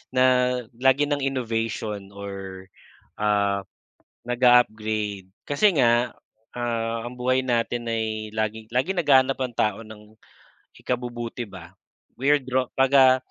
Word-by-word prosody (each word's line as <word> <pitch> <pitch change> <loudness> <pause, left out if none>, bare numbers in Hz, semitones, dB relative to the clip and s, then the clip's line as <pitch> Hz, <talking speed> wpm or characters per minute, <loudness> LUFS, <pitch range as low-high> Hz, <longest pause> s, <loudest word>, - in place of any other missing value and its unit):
na 130 0 +5 0.5
lagi 135 +3 +3
ng 145 - +1
innovation 115 -6 -3
or 95 -2 -8 0.6
ah, 100 -1 +2 0.7
naga-upgrade, 110 -5 +2 0.2
kasi 145 +9 +4
nga, 120 -1 +3 0.4
ah, 115 -1 -2
ang 120 - -6
buhay 130 +1 +1
natin 120 -1 -1
ay 110 -1 -2
laging 110 0 -2
laging 145 +10 0
naghahanap 135 -3 +4
ang 125 -2 -2
tao 105 0 0
ng 110 0 -14 0.6
ikabubuti 120 -1 -4
ba. 90 -3 -11 0.5
Weirdo 130 -2 +1
'pag, 135 0 +3
ah, 130 -1 +7
120 Hz, 115 wpm, -24 LUFS, 110-130 Hz, 0.7 s, ah